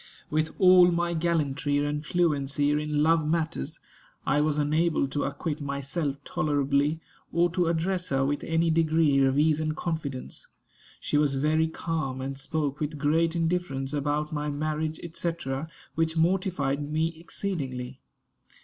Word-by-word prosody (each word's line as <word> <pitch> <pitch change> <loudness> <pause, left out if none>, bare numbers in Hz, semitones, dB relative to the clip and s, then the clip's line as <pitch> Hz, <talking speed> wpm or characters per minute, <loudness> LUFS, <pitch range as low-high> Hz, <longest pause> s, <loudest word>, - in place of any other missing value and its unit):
With 155 +1 0
all 180 -1 +7
my 170 0 0
gallantry 150 -4 0
and 145 +1 -1
fluency 145 -4 +1
in 150 0 +1
love 165 0 +4
matters, 160 - -2 0.5
I 150 - +2
was 150 0 +1
unable 155 0 +2
to 145 +1 -1
acquit 145 +2 -3
myself 140 +1 -2
tolerably, 145 +1 +1 0.3
or 170 +1 +2
to 175 0 +1
address 175 +2 0
her 135 0 +1
with 145 +1 -1
any 165 0 +1
degree 160 -3 +3
of 135 0 +2
ease 155 0 +3
and 155 -1 -1
confidence. 150 -6 -4 0.5
She 150 - 0
was 145 -2 +2
very 155 +3 +2
calm, 160 -5 -3
and 135 +1 -4
spoke 145 0 -2
with 150 0 -3
great 160 +3 +2
indifference 165 -5 -1
about 150 +1 -1
my 150 0 -2
marriage, 155 +2 -2
&c., 170 0 0 0.6
which 160 0 0
mortified 160 -5 0
me 160 +1 +1
exceedingly. 135 -9 -4
155 Hz, 140 wpm, -27 LUFS, 145-165 Hz, 0.6 s, all